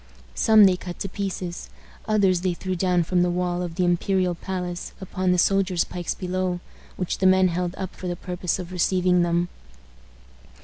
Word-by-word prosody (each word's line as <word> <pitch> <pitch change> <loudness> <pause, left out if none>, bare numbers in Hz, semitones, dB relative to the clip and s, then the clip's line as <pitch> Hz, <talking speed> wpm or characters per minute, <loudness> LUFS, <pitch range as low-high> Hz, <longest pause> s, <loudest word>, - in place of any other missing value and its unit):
Some 220 - +6
they 185 -2 +4
cut 180 -1 -7
to - - -1
pieces. 185 -3 -4 0.4
Others 195 -5 +3
they 180 -1 0
threw 185 +1 -3
down 180 -1 +2
from 180 +2 +1
the 180 - +2
wall 180 0 -1
of 175 -2 -4
the 180 0 +1
imperial 180 +1 +1
palace 180 0 -5
upon 185 -1 -1
the 180 - +3
soldiers' 185 -1 +2
pikes 175 -1 -4
below, 185 -1 -2 0.4
which 180 - -3
the 190 - +4
men 185 0 +5
held 175 +1 -2
up 190 -1 -5
for 185 - -6
the 175 - -2
purpose 180 0 -3
of 180 -1 -7
receiving 180 0 +2
them. 175 0 +1
180 Hz, 180 wpm, -24 LUFS, 175-185 Hz, 0.4 s, Some